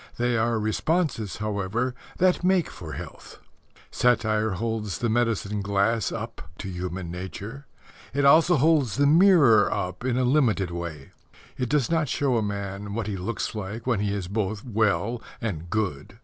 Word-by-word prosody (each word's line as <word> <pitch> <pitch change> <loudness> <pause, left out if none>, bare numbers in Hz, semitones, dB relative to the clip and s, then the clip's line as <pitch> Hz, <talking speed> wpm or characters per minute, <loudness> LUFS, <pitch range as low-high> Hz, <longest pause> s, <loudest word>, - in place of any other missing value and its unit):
They 120 0 +1
are 115 0 +1
responses, 115 - -1
however, 110 +4 -2 0.2
that 180 -1 +2
make 185 -1 +2
for 80 -4 -8
health. - - -9 0.5
Satire 110 -3 +2
holds 110 -1 -2
the 120 - -1
medicine 110 -3 0
glass 100 +2 +1
up 115 +1 -6 0.2
to 100 - -6
human 90 -1 -5
nature. 100 +9 -7 0.4
It 140 +1 +1
also 160 +5 +6
holds 145 -6 +3
the 145 - +3
mirror 150 - +6
up 90 +4 -3
in 125 -1 0
a 130 - +2
limited 125 - +2
way. 85 -5 -6 0.4
It 125 -2 -2
does 145 -1 +1
not 160 -4 +1
show 135 -3 +1
a - - +1
man 100 0 -4
what 115 -2 -2
he 105 -1 -3
looks 95 +5 -3
like 105 +1 -6
when 120 -5 +1
he 100 0 0
is 100 -3 -3
both 105 +1 -2
well 110 0 0 0.2
and 85 -7 -4
good. 100 -2 -3
110 Hz, 165 wpm, -25 LUFS, 100-125 Hz, 0.5 s, also